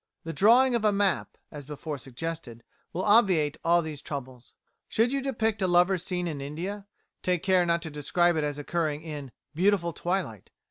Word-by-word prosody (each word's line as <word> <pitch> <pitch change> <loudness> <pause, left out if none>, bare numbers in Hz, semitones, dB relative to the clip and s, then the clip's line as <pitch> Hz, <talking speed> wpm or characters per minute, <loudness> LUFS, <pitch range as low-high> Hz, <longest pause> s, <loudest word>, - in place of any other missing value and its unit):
The 165 - -5
drawing 245 +7 +5
of 235 -2 0
a 210 - +4
map, 200 -2 0
as 150 -2 -8
before 150 0 -5
suggested, 135 -3 -6 0.3
will 180 - -3
obviate 190 -9 +4
all 170 +1 +3
these 155 -2 -6
troubles. 130 -4 -7 0.4
Should 230 +3 +2
you 275 0 0
depict 225 -5 -1
a 185 - +2
lover's 175 +1 +3
scene 180 -1 -2
in 150 -4 -4
India, 180 +8 -5 0.3
take 180 -2 0
care 185 -2 +3
not 170 0 +1
to 160 - -5
describe 170 +4 +1
it 155 - 0
as 145 -1 -2
occurring 155 0 -2
in 145 -5 -7 0.2
"beautiful 175 0 +2
twilight." 175 - -3
170 Hz, 180 wpm, -27 LUFS, 150-195 Hz, 0.4 s, drawing